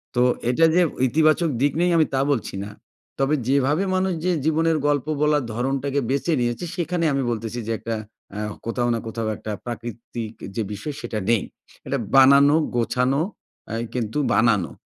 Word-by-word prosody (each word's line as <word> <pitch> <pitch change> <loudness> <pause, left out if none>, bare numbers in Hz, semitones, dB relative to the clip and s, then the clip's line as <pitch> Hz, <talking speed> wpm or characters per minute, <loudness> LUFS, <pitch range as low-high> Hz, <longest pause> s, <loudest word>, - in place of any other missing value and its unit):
তো 120 - +3 0.3
এটা 165 +7 +4
যে 180 - +5 0.3
ইতিবাচক 155 +4 +3
দিক 145 - +3
নেই 180 - +3
আমি 160 - +5
তা 135 - +2
বলছি 115 -7 -2
না। 100 - -7 0.5
তবে 135 +3 +2
যেভাবে 140 +6 +2
মানুষ 185 0 +1
যে 180 - +3
জীবনের 160 +1 +2
গল্প 145 -2 +1 0.2
বলার 150 -2 +3
ধরনটাকে 135 +3 -1
বেঁচে 140 +5 0
নিয়েছে, 120 +8 -1
সেখানে 175 -1 -1
আমি 135 - +1
বলতেছি 115 +1 -4
যে, - - -1
একটা 115 0 -3 0.4
আ - - -3 0.3
কোথাও 120 +1 0
না 115 - -1
কোথাও 110 0 -3
একটা 110 - -6
প্রাকৃতিক 115 -1 -6 0.2
যে 115 - 0
বিষয়, 145 +9 -5
সেটা 110 - -3
নেই। 115 -4 +3 0.4
এটা 140 - 0 0.2
বানানো, 140 +2 +7 0.2
গোছানো 125 +4 +1 0.5
অ্যা 110 - -4 0.2
কিন্তু 115 +1 -2 0.2
বানানো। 105 -3 +3
135 Hz, 165 wpm, -23 LUFS, 115-150 Hz, 0.5 s, বানানো